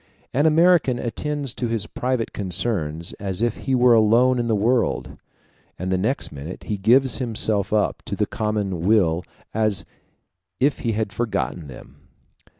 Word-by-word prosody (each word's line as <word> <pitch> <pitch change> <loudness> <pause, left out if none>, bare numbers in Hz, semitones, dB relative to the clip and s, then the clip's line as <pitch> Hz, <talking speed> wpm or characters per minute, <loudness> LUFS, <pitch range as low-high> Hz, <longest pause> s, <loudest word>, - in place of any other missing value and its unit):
An 145 +5 +3
American 160 -5 +4
attends 140 +2 -3
to 120 - -3
his 115 -3 0
private 125 0 -2
concerns 85 -4 -2
as 100 +2 -3
if 120 -1 +1
he 135 - +2
were 125 -1 +5
alone 115 +3 +4
in 120 - -1
the 115 - +2
world, 115 +4 0 0.6
and 95 +1 -3
the - - +2
next 115 +8 -1
minute 75 +6 -8
he 105 - -3
gives 125 +6 +3
himself 110 -5 +1
up 105 -1 0
to - - -4
the - - 0
common 105 -4 -2
weal 90 -4 +2 0.3
as 110 -4 0 0.7
if 140 +2 +1
he 115 -2 -1
had 105 -1 -2
forgotten 80 - -2
them. 65 -3 -13
110 Hz, 155 wpm, -22 LUFS, 95-125 Hz, 0.7 s, were